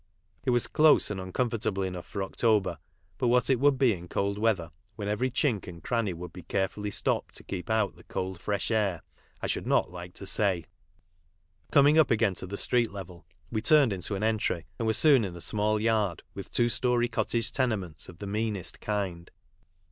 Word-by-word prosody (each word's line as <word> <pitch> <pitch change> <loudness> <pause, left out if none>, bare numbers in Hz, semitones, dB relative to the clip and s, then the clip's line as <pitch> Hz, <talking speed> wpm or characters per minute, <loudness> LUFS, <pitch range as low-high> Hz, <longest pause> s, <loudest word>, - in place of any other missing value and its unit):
It - - +1
was 120 -1 +3
close 155 -7 +4
and 95 -2 -3
uncomfortable 105 0 -1
enough 90 -2 -5
for 100 - -3
October, 95 -5 +1 0.4
but 125 - +1
what 125 +2 +3
it 130 - +2
would 140 0 +4
be 130 -4 +4
in 90 -2 -8
cold 100 +3 -1
weather, 100 -8 +1 0.2
when 105 -3 -5
every 105 +5 0
chink 125 -4 0
and 85 -2 -10
cranny 115 -5 0
would 85 0 -8
be 90 - -9
carefully 100 +3 -2
stopped 100 - -1
to - - -11
keep 95 +1 -6
out 110 0 +1
tin? - - -18
cold, 95 -1 -4
fresh 100 +2 -1
air, 100 -8 0 0.4
I - - +1
should - - -2
not - - +2
like 90 0 -9
to 100 - -5
say.. 95 -4 +1 1.1
Coming 145 +3 +6
up 155 - +5
again 110 -3 +2
to 95 - -7
the 100 +2 -5
street 120 -2 +2
level 90 -5 -9 0.2
we 110 -2 -1
turned 145 -4 +5
into 95 +2 -2
an 100 - -3
entry, 110 -6 0
and 115 - -1
were - - +4
soon 140 0 +5
in 95 -3 -4
a - - -8
small 105 +3 0
yard 105 -6 0
with 100 - -8
two 120 - +2
storey 120 0 +2
cottage 115 -1 0
tenements 105 - -2
of 85 - -12
the 100 - -7
meanest 105 -2 -2
kind. 95 -5 -3
105 Hz, 200 wpm, -28 LUFS, 95-115 Hz, 1.1 s, Coming